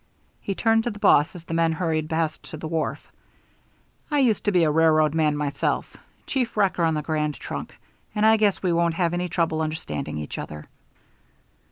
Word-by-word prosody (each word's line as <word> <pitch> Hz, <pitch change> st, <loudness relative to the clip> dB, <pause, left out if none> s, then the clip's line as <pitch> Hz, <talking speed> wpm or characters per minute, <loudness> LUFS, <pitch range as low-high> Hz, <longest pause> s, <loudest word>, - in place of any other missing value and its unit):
He 195 Hz, -, -4 dB
turned 225 Hz, +1 st, +2 dB
to -, -, +1 dB
the 205 Hz, -, -7 dB
boss 185 Hz, -6 st, +4 dB
as 170 Hz, -2 st, -10 dB
the 165 Hz, -, -5 dB
men 165 Hz, 0 st, +2 dB
hurried 160 Hz, -2 st, -1 dB
past 160 Hz, -1 st, -1 dB
to 155 Hz, -, -7 dB
the 155 Hz, -, -6 dB
wharf. 160 Hz, -1 st, -3 dB, 1.0 s
"I 295 Hz, -, 0 dB
used 245 Hz, -6 st, +2 dB
to 205 Hz, -, +3 dB
be 180 Hz, -3 st, +3 dB
a 155 Hz, -, +3 dB
railroad 155 Hz, -1 st, +4 dB
man 155 Hz, -2 st, +1 dB
myself 145 Hz, -1 st, -2 dB, 0.3 s
chief 250 Hz, -5 st, -2 dB
wrecker 195 Hz, -4 st, +2 dB
on 160 Hz, -1 st, +2 dB
the 150 Hz, -, -2 dB
Grand 150 Hz, -1 st, -1 dB
Trunk -, -, -7 dB, 0.4 s
and 210 Hz, +1 st, +2 dB
I 220 Hz, 0 st, +7 dB
guess 210 Hz, -3 st, +1 dB
we 180 Hz, -2 st, +2 dB
won't 170 Hz, -1 st, +1 dB
have 170 Hz, -1 st, 0 dB
any 175 Hz, 0 st, -2 dB
trouble 160 Hz, -1 st, 0 dB
understanding 155 Hz, -, -4 dB
each 75 Hz, -1 st, -5 dB
other." 75 Hz, 0 st, -7 dB
165 Hz, 195 wpm, -24 LUFS, 155-195 Hz, 1.0 s, I